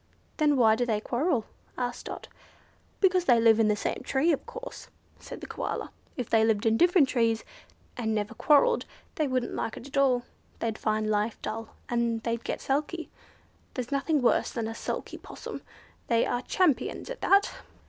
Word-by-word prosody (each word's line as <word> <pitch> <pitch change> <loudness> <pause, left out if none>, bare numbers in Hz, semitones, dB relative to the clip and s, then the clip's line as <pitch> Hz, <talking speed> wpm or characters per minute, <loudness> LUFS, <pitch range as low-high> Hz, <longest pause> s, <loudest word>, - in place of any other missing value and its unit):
"Then 295 -3 +3
why 220 -3 +5
do 245 - 0
they 220 -3 0
quarrel?" 245 +2 0 0.3
asked 245 -1 -3
Dot. - - -7 0.7
"Because 370 -2 +4
they 240 -6 +5
live 225 -1 +5
in 220 - +4
the 210 - +3
same - - -3
tree 290 +5 +2
of 290 - -2
course," - - -8 0.3
said - - -9
the - - -6
Koala. - - -4 0.3
"If 250 -4 -3
they 225 -1 +4
lived 220 0 +2
in 225 0 +4
different 350 +1 +5
trees, 230 -3 +1 0.5
and 220 -3 -1
never 210 +1 -2
quarrelled, 310 - +3 0.3
they 305 - 0
wouldn't 255 -2 -1
like 225 - -3
it - - -9
at 275 - -6
all. 255 -3 +3 0.3
They'd 225 -1 -3
find 215 0 0
life 210 +1 0
dull, 225 +1 -5
and 235 -1 0
they'd 230 0 -2
get - - -3
sulky. 300 +5 -2 0.6
There's 250 +1 -4
nothing 280 0 +1
worse 240 - +3
than 230 -2 -3
a 225 - -4
sulky - - -5
possum. - - -8 0.5
They 230 -1 +3
are 245 - -1
champions 315 - 0
at - - -7
that." 400 +1 +4
245 Hz, 180 wpm, -28 LUFS, 225-290 Hz, 0.7 s, why